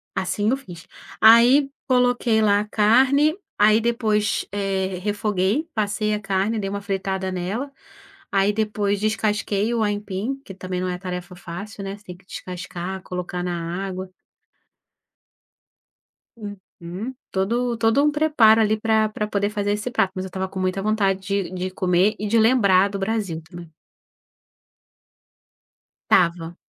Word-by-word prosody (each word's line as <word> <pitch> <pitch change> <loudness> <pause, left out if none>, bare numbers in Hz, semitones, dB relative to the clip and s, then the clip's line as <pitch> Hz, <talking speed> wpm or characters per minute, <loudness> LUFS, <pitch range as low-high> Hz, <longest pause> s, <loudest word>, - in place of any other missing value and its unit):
assim 205 +3 0
eu 265 - +1
fiz. 180 -11 -12 0.3
Aí, 240 +5 +7 0.2
coloquei 245 -3 +2
lá 205 -1 +4
a 210 - -2
carne, 260 +9 +4 0.2
aí 215 +2 +5
depois, 215 -3 0
eh, 190 -2 -2
refoguei, 205 - 0
passei 215 0 -1
a 210 - -1
carne, 195 +2 -1
dei 195 -1 -3
uma 200 0 -4
fritada 190 -1 -2
nela. 200 +10 -3 0.6
Aí 195 +1 +3
depois 205 -2 -1
descasquei 215 0 0
o 230 -2 +1
aipim, 205 +5 -2
que 195 - -9
também 185 -1 -5
não 185 - -1
é 180 - -3
tarefa 180 -1 -6
fácil, 200 +4 -8
né, 195 +1 -5
você 205 - -22
tem 180 -1 -9
que 180 - -25
descascar, 180 0 -6
colocar 180 0 -4
na 175 +1 -3
água. 185 0 -6 2.3
Uhum. 195 +1 -8 0.2
Todo 235 +5 0
todo 225 +5 +3
um 300 - +3
preparo 295 -8 +4
ali 215 0 +3
pra 220 0 +2
pra 210 0 -3
poder 205 -1 0
fazer 205 -1 -1
esse 210 +4 -2
prato, 195 -6 +1
mas 185 0 -3
eu - - -5
estava 190 +1 -3
com 190 - -6
muita 185 +1 -1
vontade 200 -2 +1
de 195 -1 -2
de 185 0 -4
comer 185 +2 +2
e 210 - -2
de 225 +2 +3
lembrar 200 -5 +4
do 200 - -4
Brasil 195 -5 -2
também. 170 -1 -12 2.4
Estava. 170 -2 +2
200 Hz, 150 wpm, -22 LUFS, 185-220 Hz, 2.4 s, Aí